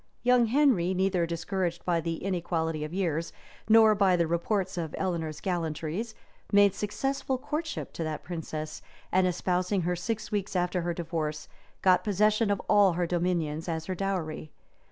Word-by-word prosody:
Young 245 Hz, -1 st, +4 dB
Henry, 225 Hz, -9 st, +3 dB
neither 185 Hz, -2 st, +1 dB
discouraged 175 Hz, +1 st, -2 dB
by 170 Hz, -2 st, +1 dB
the 165 Hz, +1 st, -4 dB
inequality 165 Hz, -4 st, -1 dB
of 155 Hz, -, -5 dB
years, 170 Hz, -3 st, -1 dB, 0.4 s
nor 220 Hz, -1 st, +7 dB
by 195 Hz, -3 st, +3 dB
the 170 Hz, -1 st, +2 dB
reports 185 Hz, +4 st, -1 dB
of 165 Hz, -3 st, -4 dB
Eleanor's 165 Hz, -5 st, -2 dB
gallantries, 175 Hz, +4 st, -3 dB, 0.4 s
made 205 Hz, -2 st, +6 dB
successful 270 Hz, +5 st, -2 dB
courtship 300 Hz, +4 st, -4 dB
to 165 Hz, -, -3 dB
that 155 Hz, -1 st, -4 dB
princess, 160 Hz, -3 st, -5 dB, 0.3 s
and 185 Hz, 0 st, +3 dB
espousing 180 Hz, +2 st, 0 dB
her 180 Hz, +1 st, 0 dB
six 220 Hz, +5 st, -4 dB
weeks 205 Hz, -1 st, -2 dB
after 180 Hz, 0 st, +1 dB
her 170 Hz, 0 st, -2 dB
divorce, 160 Hz, -3 st, -3 dB, 0.4 s
got 185 Hz, -1 st, +5 dB
possession 210 Hz, +1 st, +2 dB
of 200 Hz, -1 st, +1 dB
all 205 Hz, -3 st, +5 dB
her 175 Hz, +1 st, 0 dB
dominions 170 Hz, -2 st, -1 dB
as 160 Hz, -1 st, -2 dB
her 185 Hz, -, -2 dB
dowry. 175 Hz, -5 st, -3 dB
180 Hz, 155 wpm, -28 LUFS, 165-205 Hz, 0.4 s, nor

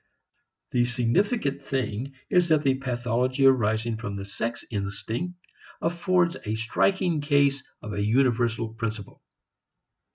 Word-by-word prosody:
The 120 Hz, -1 st, +3 dB
significant 140 Hz, -, 0 dB
thing 135 Hz, 0 st, -3 dB
is 180 Hz, -1 st, +3 dB
that 155 Hz, -2 st, +4 dB
the 135 Hz, -2 st, +4 dB
pathology 125 Hz, 0 st, 0 dB
arising 110 Hz, -3 st, +3 dB
from 105 Hz, -3 st, -5 dB
the 100 Hz, 0 st, -5 dB
sex 115 Hz, +4 st, -4 dB
instinct 105 Hz, -, -3 dB, 0.4 s
affords 175 Hz, +1 st, +1 dB
a 110 Hz, 0 st, -2 dB
striking 160 Hz, -, +1 dB
case 140 Hz, -1 st, +3 dB, 0.2 s
of 105 Hz, -, -5 dB
a 100 Hz, 0 st, -1 dB
universal 115 Hz, 0 st, +2 dB
principle. 110 Hz, -3 st, -6 dB
125 Hz, 120 wpm, -26 LUFS, 110-140 Hz, 0.4 s, that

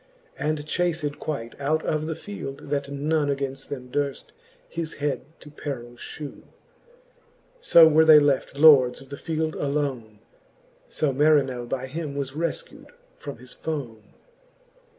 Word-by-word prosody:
And 150 Hz, -1 st, -1 dB
chaced 160 Hz, -3 st, -1 dB
quite 140 Hz, -4 st, -5 dB
out 155 Hz, +3 st, 0 dB
of 155 Hz, 0 st, -1 dB
the 160 Hz, -, -2 dB
field, 145 Hz, -7 st, -8 dB
that 140 Hz, -1 st, -1 dB
none 145 Hz, +2 st, 0 dB
Againft 135 Hz, -1 st, -3 dB
them 125 Hz, -3 st, -7 dB
durft 140 Hz, -1 st, -2 dB, 0.4 s
his 165 Hz, -1 st, -5 dB
head 145 Hz, -1 st, -1 dB, 0.2 s
to 150 Hz, -, -12 dB
perill 125 Hz, -5 st, -6 dB
(hew. 145 Hz, +4 st, -9 dB, 1.1 s
So 170 Hz, -, +8 dB
were 160 Hz, 0 st, +5 dB
they 160 Hz, -1 st, +9 dB
left 145 Hz, -1 st, +2 dB
lords 140 Hz, -5 st, +7 dB
of 135 Hz, -, -15 dB
the 140 Hz, -, -6 dB
field 160 Hz, 0 st, -2 dB
alone: 140 Hz, -7 st, -2 dB, 0.7 s
So 145 Hz, -3 st, 0 dB
Marinell 135 Hz, -4 st, +2 dB
by 130 Hz, 0 st, -2 dB
him 145 Hz, +1 st, -5 dB
was 140 Hz, -2 st, -3 dB
refcu'd 165 Hz, +4 st, -5 dB, 0.3 s
from 140 Hz, -4 st, -8 dB
his 125 Hz, +2 st, -13 dB
fone. 120 Hz, -9 st, -5 dB
145 Hz, 140 wpm, -25 LUFS, 135-155 Hz, 1.1 s, they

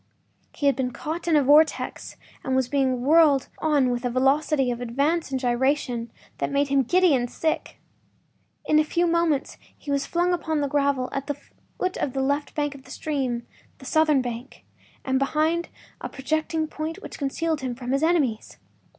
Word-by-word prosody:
He 290 Hz, -, -3 dB
had 280 Hz, -, +4 dB
been 260 Hz, -2 st, -1 dB
caught 315 Hz, +7 st, -5 dB
in 330 Hz, -, +3 dB
a 295 Hz, -, +5 dB
vortex 300 Hz, +4 st, +2 dB, 0.3 s
and 260 Hz, -, -1 dB
was 260 Hz, -2 st, +2 dB
being 260 Hz, -2 st, 0 dB
whirled 295 Hz, -2 st, +4 dB
on 290 Hz, -5 st, +2 dB
with 240 Hz, 0 st, -2 dB
a 245 Hz, -, 0 dB
velocity 270 Hz, +1 st, +2 dB
of 240 Hz, 0 st, -4 dB
advance 280 Hz, +8 st, 0 dB
and 265 Hz, -1 st, -2 dB
gyration 245 Hz, -1 st, 0 dB, 0.3 s
that -, -, -1 dB
made 280 Hz, 0 st, +1 dB
him 275 Hz, 0 st, +3 dB
giddy 360 Hz, +5 st, +3 dB
and 245 Hz, -2 st, +1 dB
sick. 315 Hz, +4 st, -2 dB, 0.9 s
In 305 Hz, 0 st, +4 dB
few 345 Hz, +3 st, 0 dB
moments 335 Hz, -4 st, 0 dB, 0.2 s
he 290 Hz, -, -6 dB
was 280 Hz, 0 st, 0 dB
flung 350 Hz, +1 st, +1 dB
upon 320 Hz, -3 st, -1 dB
the 285 Hz, -, 0 dB
gravel 280 Hz, -2 st, +1 dB
at 275 Hz, 0 st, -4 dB
the 290 Hz, -1 st, -3 dB, 0.4 s
foot 370 Hz, 0 st, -2 dB
of 260 Hz, -, -2 dB
the 270 Hz, -1 st, -1 dB
left 285 Hz, +2 st, -1 dB
bank 290 Hz, -1 st, -1 dB
of 275 Hz, -1 st, -13 dB
the -, -, -16 dB
stream—the 265 Hz, -3 st, -5 dB
southern 305 Hz, -2 st, +3 dB
bank—and 255 Hz, +2 st, -6 dB
behind 315 Hz, +5 st, 0 dB, 0.3 s
a -, -, -4 dB
projecting 315 Hz, +3 st, -1 dB
point 315 Hz, +3 st, -5 dB
which -, -, -9 dB
concealed 310 Hz, +2 st, -1 dB
him 255 Hz, -2 st, -3 dB
from 250 Hz, 0 st, -5 dB
his 275 Hz, +1 st, +1 dB
enemies. 310 Hz, -9 st, 0 dB
280 Hz, 175 wpm, -25 LUFS, 260-315 Hz, 0.9 s, a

